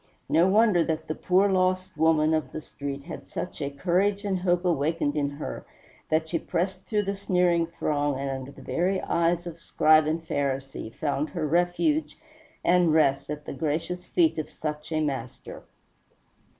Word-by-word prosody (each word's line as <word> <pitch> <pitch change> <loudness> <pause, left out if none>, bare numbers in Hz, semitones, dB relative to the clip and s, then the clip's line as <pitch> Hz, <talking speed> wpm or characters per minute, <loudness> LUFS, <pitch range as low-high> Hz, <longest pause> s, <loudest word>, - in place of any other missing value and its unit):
No 170 +3 +4
wonder 205 -3 +4
that 160 -1 -2
the 155 - -1
poor 185 +4 +2
lost 185 -1 +1
woman 155 0 +3
of 155 -5 -1
the - - -3
street 140 -2 -6
had - - -9
such 180 - -6
a 140 - -1
courage 190 +8 0
and 190 -2 0
hope 180 0 +1
awakened 155 -2 +1
in 145 -2 0
her 145 +1 -6 0.5
that 160 +1 +1
she 165 0 -1
pressed 185 +4 -2
through 210 -2 +1
the 200 0 -2
sneering 180 -3 +2
throng, 145 -4 -1
and 140 +1 -3
under 135 0 -6
the - - -14
very 185 +3 0
eyes 170 +1 +1
of 170 -1 -7
Scribe 155 -1 +4
and 160 +1 -2
Pharisee 135 -4 -2
found 145 +3 -2
her 165 -4 -3
refuge 175 - +1 0.5
and 175 -2 +4
rest 140 -4 +2
at 150 0 -5
the - - -5
gracious 165 +5 -3
feet 325 - +2
of 155 - -4
such 150 0 -5
a 155 0 +1
Master. 135 -5 -4
160 Hz, 175 wpm, -26 LUFS, 150-180 Hz, 0.5 s, No